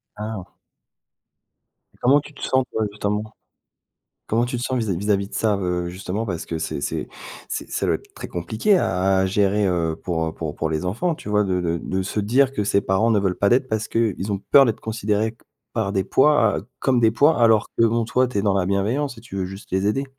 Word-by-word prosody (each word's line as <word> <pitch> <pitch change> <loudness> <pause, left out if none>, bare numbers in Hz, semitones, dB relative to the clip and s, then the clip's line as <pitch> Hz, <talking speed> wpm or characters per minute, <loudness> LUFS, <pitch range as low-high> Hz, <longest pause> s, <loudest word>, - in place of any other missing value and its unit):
Ah. 105 -3 -6 1.5
Comment 135 +4 +5
tu 150 - -13
te - - -14
sens, 130 0 +2
toi, 110 -1 0
justement? 105 +1 -2 1.0
Comment 115 +2 +1
tu 125 - -3
te 120 - -4
sens 130 0 -1
vis-à-vis 100 -7 -1
vis-à-vis 100 -1 0
de - - -12
ça, 110 -2 +1
heu, 90 -2 -1
justement, 95 +4 -4
parce 90 -6 -4
que 80 - -3
c'est 80 - -3
c'est - - -3 0.4
c'est - - -4
ça - - -2
doit - - +2
être - - -22
très - - -7
compliqué 110 - +1
à 95 - +1
à 95 - +2
gérer, 100 +1 +2
heu, 85 -3 0
pour, 80 -3 -1
heu, 80 - -3
pour 80 -3 -5
pour 80 - -2
les 80 +2 -2
enfants, 160 - 0
tu 130 - -10
vois, 105 0 +2
de 90 -2 0
de 85 -1 -1
de 95 +3 -2
se 100 +3 -2
dire 130 +6 +2
que 105 -6 -1
ses 100 0 +2
parents 100 +4 +1
ne 110 - +4
veulent 95 -2 0
pas 100 - +2
d'aide 130 +2 +3
parce 110 -2 -1
qu'ils 105 -3 -1
ont 100 - -1
peur 140 - +8
d'être 115 -4 -1
considérés 110 0 -1
co 115 - -28 0.3
par 110 -4 0
des 95 -2 0
poids, 130 -7 +3
heu, - - -8
comme 130 -3 +2
des 110 -1 +5
poids, 145 +5 +3
alors 115 -1 +5
que, 115 - +4
bon, 115 +1 +2
toi, 125 +2 +1
tu 125 - -3
es - - +1
dans 100 -2 +2
la 95 -2 +1
bienveillance 115 +8 -1
et - - -10
tu 115 -4 -12
veux 95 - -1
juste 95 +2 -9
les 95 +1 +1
aider? 135 +6 0
105 Hz, 240 wpm, -22 LUFS, 95-115 Hz, 1.5 s, peur